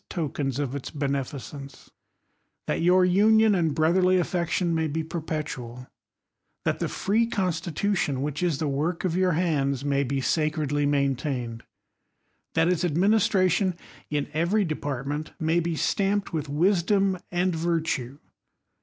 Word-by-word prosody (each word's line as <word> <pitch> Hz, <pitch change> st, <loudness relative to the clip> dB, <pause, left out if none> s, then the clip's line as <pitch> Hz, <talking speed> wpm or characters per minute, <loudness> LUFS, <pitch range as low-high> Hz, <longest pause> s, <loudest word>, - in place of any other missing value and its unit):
4okens 145 Hz, -5 st, -2 dB
of 140 Hz, -3 st, -2 dB
its 140 Hz, -, -5 dB
benciiccnce; 140 Hz, -1 st, -5 dB, 0.7 s
that -, -, -1 dB
your 180 Hz, +2 st, +5 dB
union 215 Hz, +4 st, +5 dB
and 165 Hz, -6 st, +1 dB
broth 160 Hz, +2 st, +2 dB
icrly 185 Hz, 0 st, +4 dB
affection 175 Hz, 0 st, 0 dB
may 160 Hz, -1 st, +1 dB
be 160 Hz, +2 st, -2 dB
perpetual; 150 Hz, -7 st, -5 dB, 0.8 s
that -, -, 0 dB
the -, -, -1 dB
free 225 Hz, +4 st, +1 dB
consti 180 Hz, -4 st, -1 dB
Itution, 155 Hz, -6 st, 0 dB
which 145 Hz, +2 st, -3 dB
is 170 Hz, -5 st, +1 dB
the 155 Hz, -, -1 dB
work 155 Hz, +6 st, -1 dB
of 175 Hz, -2 st, 0 dB
your 185 Hz, -1 st, +2 dB
hands, 145 Hz, -5 st, 0 dB
may 140 Hz, -1 st, +1 dB
be 135 Hz, +1 st, -1 dB
sa 155 Hz, +4 st, +1 dB, 0.2 s
lly 145 Hz, -1 st, 0 dB
maintained; 135 Hz, -4 st, -1 dB, 0.9 s
that 160 Hz, 0 st, +3 dB
its 180 Hz, -1 st, +1 dB
administration 185 Hz, +1 st, +2 dB, 0.3 s
in 145 Hz, -1 st, -1 dB
every 175 Hz, +7 st, +1 dB
de 155 Hz, -, -1 dB
ancnt 145 Hz, +1 st, -4 dB
may 160 Hz, +1 st, +2 dB
be 170 Hz, -1 st, -1 dB
stomped 200 Hz, +4 st, 0 dB
with 150 Hz, -3 st, -3 dB
wisdom 190 Hz, +4 st, +2 dB
and 180 Hz, 0 st, +1 dB
virtue 160 Hz, -6 st, -1 dB
160 Hz, 145 wpm, -26 LUFS, 140-180 Hz, 0.9 s, your